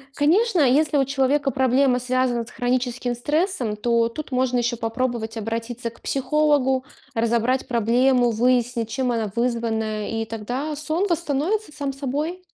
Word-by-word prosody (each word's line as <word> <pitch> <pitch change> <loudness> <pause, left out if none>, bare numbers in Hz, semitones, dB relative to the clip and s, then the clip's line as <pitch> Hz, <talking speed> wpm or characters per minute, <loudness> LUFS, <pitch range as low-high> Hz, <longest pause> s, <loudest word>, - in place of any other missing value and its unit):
конечно, 365 +6 +3
если 290 +2 +3
у 270 - +3
человека 275 +1 +1
проблема 260 -1 +3
связана 250 -1 0
с 230 - -13
хроническим 245 0 -1
стрессом, 295 - -1
то 230 +1 +2
тут 285 +5 -7
можно 255 -1 +1
ещё 240 0 0
попробовать 225 -1 -2
обратиться 230 +2 -4
к 235 - -21
психологу, 270 -2 +1 0.3
разобрать 235 +2 +1
проблему, 245 +1 +3
выяснить, 240 0 +1
чем 255 +1 -1
она 225 -3 -1
вызвана, 225 -3 -1
и 225 0 -2
тогда 245 +7 -4
сон 310 +5 -1
восстановится 340 +4 -1
сам 280 -2 -4
собой. 290 +6 -3
255 Hz, 140 wpm, -23 LUFS, 235-280 Hz, 0.3 s, конечно